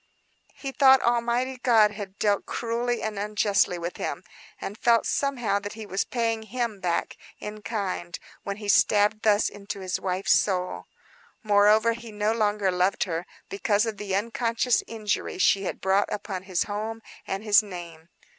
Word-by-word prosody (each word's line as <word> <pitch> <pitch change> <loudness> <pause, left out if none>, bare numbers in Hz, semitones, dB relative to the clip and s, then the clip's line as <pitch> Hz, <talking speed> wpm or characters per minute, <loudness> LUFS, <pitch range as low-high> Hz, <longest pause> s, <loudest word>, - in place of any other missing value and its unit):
He 275 - -5
thought 265 -1 +6
Almighty 240 +2 +1
God 225 -4 +4
had 200 -2 -8
dealt 205 -1 +1
cruelly 235 +1 -2
and 215 -2 -3
unjustly 205 -3 +1
with 170 +1 -5
him; - - -4 0.4
and 200 - -5
felt, 230 +1 +3
somehow, 245 -8 0
that 205 0 -7
he 220 -1 -8
was 195 -1 -1
paying 230 -2 -1
Him 225 -1 -3
back 175 -2 -2 0.2
in 210 0 -7
kind 190 -6 -3 0.2
when 200 0 -5
he 210 -1 -7
stabbed 210 +1 +3
thus 210 -1 +3
into 200 0 -7
his 185 -1 -3
wife's 185 +1 +1
soul. 185 -2 0 0.6
Moreover 210 +2 +4
he 235 -1 -9
no 210 +1 0
longer 210 -3 +1
loved 180 +2 +1
her, 170 -1 -4 0.2
because 205 +2 +1
of 220 -3 -4
the 195 -2 -3
unconscious 230 +3 +1
injury 215 -4 -3
she 195 +1 +3
had - - -4
brought 195 +2 +1
upon 190 -3 -4
his 180 - +1
home 220 +2 -5 0.2
and 195 +2 -3
his 210 -1 +6
name. 170 -5 -10
210 Hz, 165 wpm, -26 LUFS, 195-230 Hz, 0.6 s, thought